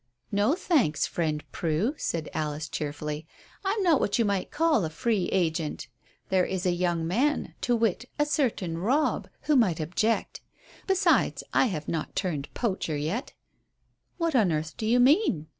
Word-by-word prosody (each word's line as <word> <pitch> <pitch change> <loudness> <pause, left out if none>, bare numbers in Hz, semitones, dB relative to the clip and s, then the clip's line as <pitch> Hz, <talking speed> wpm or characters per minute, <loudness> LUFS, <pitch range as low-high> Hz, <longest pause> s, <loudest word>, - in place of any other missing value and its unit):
"No, 205 +9 +2
thanks, 280 - +2
friend 155 -3 -2
Prue," 170 - 0
said 165 - -3
Alice 155 0 -2
cheerfully. 150 +1 -4 0.4
"I'm 400 +1 0
not 335 -6 +4
what 200 - +1
you 230 - +2
might 200 -2 -1
call 320 - +2
a 160 - -1
'free 205 +2 0
agent.' 160 -4 -1 0.4
There 185 -1 +3
is 190 -1 -2
a 180 - +3
young 175 -2 0
man, 255 - 0
to 245 - +2
wit, 230 0 0
a 295 - +3
certain 225 - -1
Robb, 265 - +1
who 300 - +2
might 195 - +3
object. 185 +8 -1 0.5
Besides, 385 0 +2
I - - +4
have 155 -8 -4
not 160 -2 -3
turned 155 -7 -2
poacher 190 -9 -1
yet." 165 - -3 0.8
"What 335 -4 0
on 210 -8 +4
earth 155 +1 -2
do 215 - -3
you 240 +2 +4
mean?" 255 - +4
190 Hz, 160 wpm, -27 LUFS, 160-255 Hz, 0.8 s, not